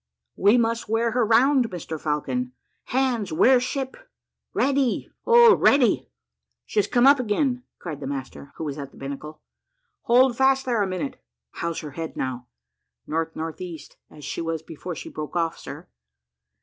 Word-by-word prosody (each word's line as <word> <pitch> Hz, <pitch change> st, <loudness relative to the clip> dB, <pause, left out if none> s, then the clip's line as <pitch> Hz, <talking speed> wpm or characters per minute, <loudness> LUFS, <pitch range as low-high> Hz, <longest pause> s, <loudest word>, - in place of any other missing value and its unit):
"We 205 Hz, +5 st, +4 dB
must 230 Hz, -2 st, 0 dB
wear 225 Hz, +1 st, +1 dB
her 245 Hz, +1 st, +2 dB
round, 245 Hz, +3 st, +4 dB
Mr 160 Hz, -3 st, -6 dB
Falcon. 250 Hz, -, -2 dB, 0.3 s
Hands, 245 Hz, -7 st, 0 dB
wear 250 Hz, +11 st, +5 dB
ship 265 Hz, +1 st, -3 dB, 0.6 s
ready, 270 Hz, -2 st, 0 dB, 0.2 s
oh, 470 Hz, -1 st, +8 dB
ready." 275 Hz, -4 st, +3 dB, 0.6 s
"She 215 Hz, -, -1 dB
has 205 Hz, -, +2 dB
come 245 Hz, +1 st, +3 dB
up 280 Hz, 0 st, +7 dB
again," 250 Hz, +2 st, 0 dB, 0.2 s
cried 155 Hz, -5 st, -7 dB
the -, -, -6 dB
master, 140 Hz, 0 st, -6 dB
who -, -, -6 dB
was 145 Hz, -1 st, -4 dB
at 140 Hz, -1 st, -6 dB
the -, -, -19 dB
binnacle. 140 Hz, +3 st, -7 dB, 0.6 s
"Hold 245 Hz, +1 st, +5 dB
fast 265 Hz, +1 st, +3 dB
there 240 Hz, -4 st, +1 dB
a 200 Hz, -, +1 dB
minute. 185 Hz, -6 st, -4 dB, 0.3 s
How's 170 Hz, -1 st, -4 dB
her 150 Hz, -, -7 dB
head 160 Hz, +3 st, -6 dB
now?" 125 Hz, -1 st, -4 dB, 0.6 s
"N.N.E., 165 Hz, +1 st, -4 dB, 0.3 s
as 150 Hz, -2 st, -12 dB
she 145 Hz, -, -4 dB
was 165 Hz, -1 st, -3 dB
before 165 Hz, +2 st, -7 dB
she -, -, -8 dB
broke 155 Hz, +2 st, -7 dB
off, 165 Hz, -1 st, -1 dB
sir?" -, -, -9 dB
205 Hz, 160 wpm, -24 LUFS, 155-250 Hz, 0.6 s, oh